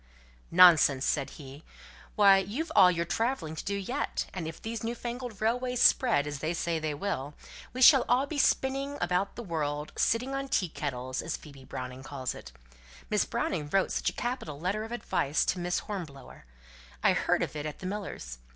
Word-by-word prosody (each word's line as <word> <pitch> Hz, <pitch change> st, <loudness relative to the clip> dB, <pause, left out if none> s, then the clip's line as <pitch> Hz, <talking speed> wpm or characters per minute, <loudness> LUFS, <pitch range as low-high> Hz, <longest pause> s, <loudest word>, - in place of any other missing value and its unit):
"Nonsense!" 165 Hz, -6 st, +6 dB
said 140 Hz, -3 st, 0 dB
he. 140 Hz, +1 st, -11 dB, 0.5 s
"Why, 200 Hz, -2 st, +7 dB
you've 225 Hz, -, -4 dB
all 185 Hz, -, +8 dB
your 170 Hz, -1 st, 0 dB
travelling 185 Hz, -5 st, -2 dB
to -, -, -5 dB
do 200 Hz, -, -2 dB
yet; 200 Hz, -1 st, -2 dB
and 175 Hz, -4 st, -4 dB
if 160 Hz, -, -7 dB
these 225 Hz, -1 st, -5 dB
new 230 Hz, +1 st, -2 dB
fangled 240 Hz, -3 st, -6 dB
railways 250 Hz, +3 st, 0 dB
spread, 235 Hz, -, +4 dB
as 145 Hz, -1 st, -5 dB
they 160 Hz, +4 st, -2 dB
say 165 Hz, -1 st, -1 dB
they 155 Hz, -1 st, -2 dB
will, 145 Hz, -4 st, -3 dB, 0.4 s
we 255 Hz, +1 st, 0 dB
shall 270 Hz, -2 st, +8 dB
all 250 Hz, +3 st, +3 dB
be 290 Hz, 0 st, -4 dB
spinning 275 Hz, +1 st, +1 dB
about 185 Hz, +2 st, 0 dB
the 240 Hz, -, -6 dB
world; 150 Hz, -5 st, -3 dB
'sitting 250 Hz, +4 st, +1 dB
on 275 Hz, 0 st, -3 dB
tea 185 Hz, -9 st, 0 dB
kettles,' 130 Hz, -4 st, -4 dB
as 160 Hz, -, -4 dB
Phoebe 140 Hz, -4 st, -14 dB
Browning 125 Hz, 0 st, -7 dB
calls 135 Hz, -1 st, -4 dB
it. -, -, -11 dB, 0.6 s
Miss 210 Hz, -2 st, +2 dB
Browning 150 Hz, -5 st, -2 dB
wrote 195 Hz, +4 st, +1 dB
such -, -, 0 dB
a -, -, -9 dB
capital 240 Hz, -, -4 dB
letter 195 Hz, +6 st, -1 dB
of 225 Hz, -, -8 dB
advice 155 Hz, -10 st, 0 dB
to 180 Hz, -, 0 dB
Miss 175 Hz, 0 st, -1 dB
Hornblower. 155 Hz, -, -7 dB, 0.6 s
I -, -, +5 dB
heard -, -, +1 dB
of -, -, -5 dB
it 150 Hz, 0 st, -3 dB
at 150 Hz, -, -7 dB
the -, -, -9 dB
Millers'. 185 Hz, -, -5 dB
180 Hz, 190 wpm, -29 LUFS, 150-230 Hz, 0.6 s, all